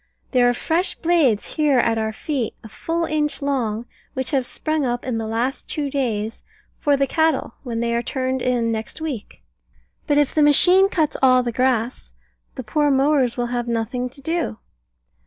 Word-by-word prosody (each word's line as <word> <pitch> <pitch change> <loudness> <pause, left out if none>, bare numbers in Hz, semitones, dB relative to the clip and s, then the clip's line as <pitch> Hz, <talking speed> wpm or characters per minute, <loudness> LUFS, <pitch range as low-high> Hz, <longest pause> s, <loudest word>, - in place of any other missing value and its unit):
There 245 -2 +4
are - - +2
fresh 330 +8 0
blades, 315 -11 +2
here 295 -3 +3
at 230 -2 +2
our 220 0 -1
feet, 255 +1 -3
a - - -9
full 330 +9 -2
inch 300 -2 -1
long, 240 -6 -1 0.3
which 260 +1 -2
have 265 -4 +1
sprung 310 -1 -1
up 245 -1 -2
in 245 -3 -2
the 220 - -3
last 235 +4 -2
two 290 -2 -2
days, 225 -5 -2 0.4
for 290 -1 +2
the 275 - +2
cattle 315 -4 +1
when 235 -3 -4
they 235 0 0
are 235 - +1
turned 260 0 -2
in 240 -2 +1
next 220 +5 -5
week. 295 -9 -6 0.6
But 290 - +2
if 290 -2 +2
the 310 - +2
machine 360 +7 +6
cuts 315 -6 0
all 255 -1 +5
the 240 - -2
grass, 250 0 -1 0.4
the 260 - -5
poor 295 +6 +1
mowers 270 -3 +2
will 240 0 -2
have 240 -1 -2
nothing 235 +2 -2
to 275 +3 -12
do. 325 -7 -2
260 Hz, 185 wpm, -22 LUFS, 235-295 Hz, 0.6 s, machine